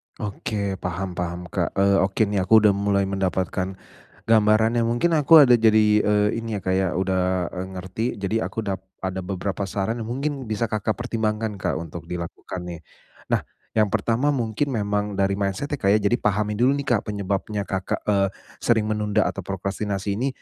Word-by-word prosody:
Oke, 100 -2 -3
paham 90 +1 -3
paham, 90 0 -4
Kak. - - -1
Eee, 100 0 +4
oke 95 +3 +2
nih, 100 -1 -1
aku 110 +4 +5
sudah 105 - +6
mulai 100 0 +1
mendapatkan 95 0 -1 0.5
gambarannya. 110 +1 +4
Mungkin 120 +9 +1
aku 155 +2 +8
ada 125 - +6
jadi, 110 -1 +4
eee, 105 0 +3
ini 110 -2 -3
ya - - -7
kayak 95 0 +1
udah, 95 -1 0
eee, 90 +1 -4
ngerti. 95 +5 -4 0.2
Jadi 100 +3 -1
aku 110 - -3
dap 95 -1 -3 0.2
ada 95 -1 -3
beberapa 95 +1 -3
saran 105 +4 -2
yang 110 - -6
mungkin 140 +1 -2
bisa 110 0 -1
Kakak 110 +1 -1
pertimbangkan, 110 -2 -1
Kak, 90 - -2
untuk 85 -3 -8
dilakukan 90 +1 -6
nih. 85 -2 -7 0.5
Nah, - - +3 0.3
yang 110 -1 +3
pertama 115 +6 +1
mungkin 125 0 0
memang 105 -4 -1
dari 100 0 +2
mindset-nya, 100 +9 -2
Kak, 100 - +3
ya, - - +3
jadi 110 +4 +3
pahami 105 +1 +1
dulu 130 +4 +3
nih, 140 - -3
Kak, - - -9
penyebabnya 100 0 -2
Kakak, 95 -1 -3
eee, 100 -2 +2 0.3
sering 115 -2 +2
menunda 105 -1 +1
atau - - -2
prokrastinasi 100 +1 -3
ini 125 +7 -1
105 Hz, 175 wpm, -23 LUFS, 95-110 Hz, 0.5 s, aku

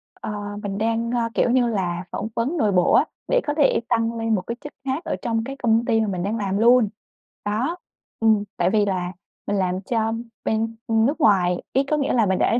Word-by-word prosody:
Ờ, - - -7 0.3
mình 200 -1 -3
đang, 230 +2 0
ơ, 235 -2 0
kiểu - - +2
như 245 -1 +3
là, 180 -5 -1
phỏng - - -3
vấn 275 +9 -1
nội 210 -5 +2
bộ 180 -2 +3
á, - - +5 0.2
để - - +3
có 295 - +1
thể 290 - +4
tăng 230 -1 +1
lên 225 -1 +1
một 185 - -1
cái 235 - -2
chức 295 0 -9
khác 270 +6 -2
ở 320 - -2
trong 225 -1 -1
cái 270 +3 -6
công 230 0 +3
ty 225 0 +2
mà 220 - 0
mình 185 -3 -2
đang 215 +3 -1
làm 195 -2 -1
luôn. 235 0 +5 0.6
Đó. 250 +12 -1 0.4
Ừm, 220 -2 +3
tại 175 +1 +2
vì 210 0 +3
là 180 -2 -1 0.4
mình 205 - 0
làm 185 0 0
cho 225 +1 0 0.3
bên 225 +1 0
nước 225 +8 +2
ngoài 180 -6 +3
ấy, 270 - +3
có 305 - +3
nghĩa 280 - 0
là 230 -3 +3
mình 190 -1 +1
đã 235 - +3
225 Hz, 230 wpm, -23 LUFS, 200-240 Hz, 0.6 s, á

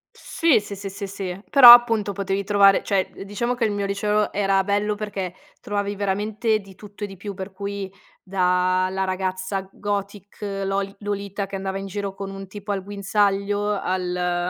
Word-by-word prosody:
Sì, 325 -9 +2
sì, 205 -1 -8
sì, 200 0 -6
sì, 200 +1 -6
sì, 190 -2 -5
però 260 -4 +11
appunto 230 -4 +4
potevi 195 0 -2
trovare, 200 -1 +5
cioè, 195 -2 0
diciamo 220 +5 -2
che 245 -2 0
il 215 - 0
mio 205 -1 -2
liceo 210 +1 0
era 195 -1 +2
bello 205 +1 0
perché 205 -4 -4 0.3
trovavi 205 0 -2
veramente 210 +3 0
di 195 -2 -14
tutto 205 +1 -11
e - - -1
di 195 -1 -11
più, 200 +2 -6
per 190 +1 -7
cui 200 0 -5 0.3
dalla 185 0 +1
ragazza 185 +1 -2
gothic 200 -1 -5 0.3
Lol 195 0 -2
Lolita 200 -1 -3
che 195 - -7
andava 190 0 -3
in 195 - -5
giro 200 0 -4
con 195 0 -6
un 195 0 -8
tipo 205 +2 -7
al 195 -2 -2
guinzaglio, 205 0 0
al 180 -1 -1
200 Hz, 175 wpm, -23 LUFS, 190-205 Hz, 0.3 s, però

